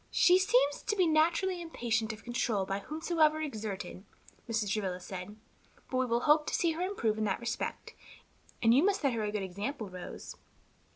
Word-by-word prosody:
"She 365 Hz, +1 st, +5 dB
seems 380 Hz, -7 st, +3 dB
to 420 Hz, -, -1 dB
be 370 Hz, -3 st, +3 dB
naturally 340 Hz, +3 st, +2 dB
impatient 230 Hz, -9 st, -1 dB
of 220 Hz, 0 st, -10 dB
control 235 Hz, -4 st, 0 dB
by 195 Hz, +1 st, -2 dB
whomsoever 310 Hz, -, +1 dB
exerted," 215 Hz, -, -5 dB, 0.5 s
Mrs. 215 Hz, -3 st, 0 dB
Travilla 190 Hz, -4 st, -2 dB
said, 185 Hz, +2 st, -7 dB, 0.6 s
"but 255 Hz, -, 0 dB
we 255 Hz, 0 st, +1 dB
will 235 Hz, 0 st, +1 dB
hope 300 Hz, +2 st, +4 dB
to -, -, 0 dB
see 335 Hz, -, +2 dB
her 325 Hz, +2 st, -4 dB
improve 235 Hz, -, 0 dB
in -, -, 0 dB
that 195 Hz, -, 0 dB
respect, 235 Hz, -1 st, -4 dB, 0.7 s
and 225 Hz, 0 st, +6 dB
you 275 Hz, +5 st, +5 dB
must 400 Hz, +1 st, +2 dB
set 275 Hz, -4 st, +2 dB
her 230 Hz, -, -1 dB
a 210 Hz, -1 st, -1 dB
good 210 Hz, -2 st, -2 dB
example, 205 Hz, +5 st, -4 dB
Rose. 180 Hz, -1 st, -8 dB
240 Hz, 185 wpm, -31 LUFS, 210-320 Hz, 0.7 s, and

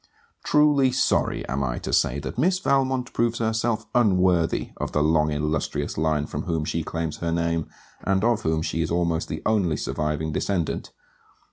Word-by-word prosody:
Truly 145 Hz, -3 st, +4 dB
sorry 130 Hz, -, +1 dB
am 70 Hz, +1 st, -1 dB
I -, -, -2 dB
to -, -, -5 dB
say 65 Hz, -, +2 dB
that -, -, -5 dB
Miss 180 Hz, +6 st, +3 dB
Valmont 135 Hz, -7 st, 0 dB
proves 115 Hz, 0 st, +1 dB
herself 110 Hz, 0 st, 0 dB
unworthy 90 Hz, -7 st, +2 dB
of -, -, -4 dB
the 75 Hz, -, +2 dB
long 75 Hz, 0 st, +2 dB
illustrious 75 Hz, 0 st, -2 dB
line 80 Hz, -1 st, +1 dB
from 75 Hz, -, -4 dB
whom 80 Hz, -3 st, -1 dB
she 80 Hz, +1 st, -1 dB
claims 80 Hz, -1 st, -3 dB
her 85 Hz, -1 st, -2 dB
name, 85 Hz, -1 st, -1 dB, 0.3 s
and 95 Hz, 0 st, +1 dB
of 115 Hz, -1 st, +2 dB
whom 80 Hz, 0 st, 0 dB
she 80 Hz, -, -1 dB
is 80 Hz, -, -1 dB
almost 85 Hz, -1 st, 0 dB
the -, -, -5 dB
only 95 Hz, -8 st, +2 dB
surviving 75 Hz, +2 st, -2 dB
descendant. 85 Hz, 0 st, -2 dB
85 Hz, 170 wpm, -24 LUFS, 80-115 Hz, 0.3 s, Truly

